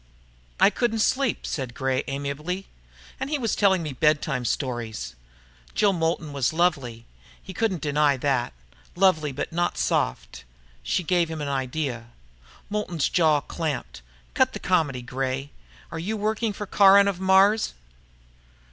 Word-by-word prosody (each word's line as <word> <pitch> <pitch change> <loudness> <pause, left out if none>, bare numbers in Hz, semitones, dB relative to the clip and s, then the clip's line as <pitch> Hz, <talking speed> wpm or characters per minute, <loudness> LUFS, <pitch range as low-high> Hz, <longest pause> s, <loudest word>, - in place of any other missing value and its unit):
"I 200 - +6
couldn't 230 +2 0
sleep," 260 +3 +1
said 130 -4 -4
Gray 130 -1 0
amiably. 145 +7 -4 0.6
"He 300 +1 -1
was 230 -5 -1
telling 190 -4 +3
me 150 -3 -4
bedtime 145 -2 +1
stories." 115 - -3 0.6
Jill 205 -2 +3
Moulton 165 -3 -1
was 140 +1 0
lovely, 140 -9 0 0.3
he 190 - -10
couldn't 190 -3 -1
deny 145 -1 +2
that. 130 - 0 0.4
Lovely, 175 -6 +3
but 145 +5 -5
not 175 +1 0
soft. - - -1 0.4
She - - -1
gave 170 0 +1
him 160 -1 -5
an 145 -1 -3
idea. 130 -3 -3 0.6
Moulton's 205 -7 -1
jaw 155 -4 +3
clamped. 150 - -4 0.3
"Cut - - +2
the - - -5
comedy, 135 -6 0
Gray. 135 +2 -3 0.4
Are - - -5
you 210 +7 -3
working 215 +1 -1
for 210 +1 -6
Caron 200 0 +6
of 195 -3 -1
Mars?" 190 - +4
155 Hz, 140 wpm, -25 LUFS, 135-190 Hz, 0.6 s, I